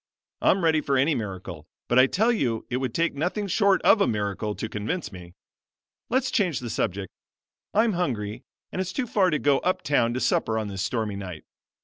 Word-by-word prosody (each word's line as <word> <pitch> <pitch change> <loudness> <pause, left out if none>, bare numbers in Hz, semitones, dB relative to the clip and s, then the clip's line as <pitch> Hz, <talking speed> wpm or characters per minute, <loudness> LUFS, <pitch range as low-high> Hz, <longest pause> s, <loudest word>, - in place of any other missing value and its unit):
I'm 190 - +3
ready 160 -2 +3
for 140 -2 +1
any 140 +5 +3
miracle; 95 - -6 0.2
but 120 - +4
I 130 - +7
tell 220 - +2
you 120 - -1
it 125 - +1
would 130 -2 -2
take 170 0 +1
nothing 175 +8 -2
short 200 0 +2
of 210 - +5
a - - +4
miracle 105 0 -2
to - - -4
convince 110 - -3
me. 90 -2 -11 0.7
Let's 260 +3 +1
change 180 - +1
the 120 -2 -5
subject. 95 -1 -2 0.6
I'm 220 +1 +4
hungry 115 - -2 0.3
and 185 - -2
it's 185 0 -4
too 260 - -1
far 200 -5 +2
to 155 - +1
go 140 -2 +3
up 185 - -1
town 120 -5 +2
to - - -1
supper 110 -3 +1
on 110 -2 -2
this 95 -1 -4
stormy 105 0 -2
night. 90 -5 -7
130 Hz, 205 wpm, -25 LUFS, -, 0.7 s, I